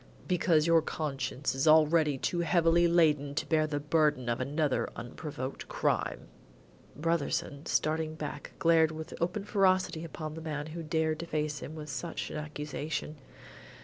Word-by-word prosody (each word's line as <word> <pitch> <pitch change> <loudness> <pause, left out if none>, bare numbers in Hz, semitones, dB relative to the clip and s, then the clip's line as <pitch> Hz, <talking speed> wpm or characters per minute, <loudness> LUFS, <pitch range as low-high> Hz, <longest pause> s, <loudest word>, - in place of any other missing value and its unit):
"Because 170 -4 +3
your 165 -1 +5
conscience 135 -4 -3
is 135 +4 0
already 155 -1 +5
too 175 +6 -1
heavily 170 0 +4
laden 150 -4 +3
to - - -1
bear 155 -1 +2
the 145 -1 -2
burden 150 -4 +1
of 120 - 0
another 145 +1 0
unprovoked 130 +2 -6
crime." - - -1 0.7
Brotherson, 155 -2 -1
starting 155 0 0
back, 150 -2 -6
glared 165 -1 +4
with 160 0 -7
open 185 +4 -1
ferocity 185 -5 +2
upon 155 -2 -6
the 160 - -7
man 150 -2 -4
who 160 +2 -6
dared 160 0 0
to 170 - -5
face 150 -2 -2
him 155 - -7
with 150 -1 -7
such 140 +5 -4
an - - -4
accusation. 150 0 -4
155 Hz, 150 wpm, -30 LUFS, 145-165 Hz, 0.7 s, your